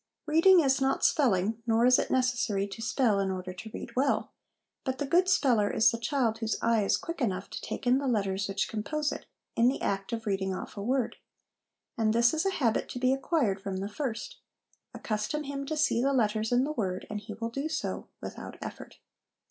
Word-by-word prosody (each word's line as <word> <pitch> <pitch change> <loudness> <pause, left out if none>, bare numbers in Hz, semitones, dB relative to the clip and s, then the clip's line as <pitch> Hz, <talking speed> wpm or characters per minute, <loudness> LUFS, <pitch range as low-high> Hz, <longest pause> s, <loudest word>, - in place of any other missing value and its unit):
Reading 335 +4 +6
is 270 -2 +2
not 270 0 +2
spelling, 220 -5 +2
nor 230 +1 +3
is 255 0 +6
it - - -1
necessary 245 -6 +1
to 200 +3 -8
spell 225 -3 +2
in 195 -1 0
order 185 -1 -4
to 220 +5 -9
read - - -8
well; 270 +2 +1 0.5
but 260 -1 -2
the 285 - -2
good 355 +6 +3
speller 235 - +3
is 220 - +4
the 230 - -4
child 235 -3 0
whose 225 -1 -1
eye 230 -2 +2
is 195 - +2
quick 335 -2 -6
enough 195 -5 -1
to - - -6
take - - -5
in 250 +2 +4
the 280 - -2
letters 195 -4 0
which 195 0 -1
compose 295 +8 -2
it, - - -7 0.3
in 235 - +4
the 260 - +1
act 195 0 -2
of 230 -1 -4
reading 190 -2 -1
off - - -7
a 200 - -5
word; 250 +3 0 0.8
and 215 -1 +2
this 235 +3 +4
is 320 +5 0
a - - +3
habit 245 - 0
to - - -6
be 255 +1 +2
acquired 270 - 0
from 195 -1 -4
the 195 +1 -3
first: 230 +1 -4 0.5
accustom 215 +8 -3
him 275 -1 -5
to 310 - -2
see 295 -6 +2
the 275 +2 +2
letters 220 -2 +1
in 245 +1 +4
the 295 - -1
word, 190 -9 -2
and 210 - -4
he 210 +1 -8
will 230 0 -3
do 275 +6 -3
so 315 - -3
without - - -8
effort. - - -8
235 Hz, 215 wpm, -29 LUFS, 210-275 Hz, 0.8 s, Reading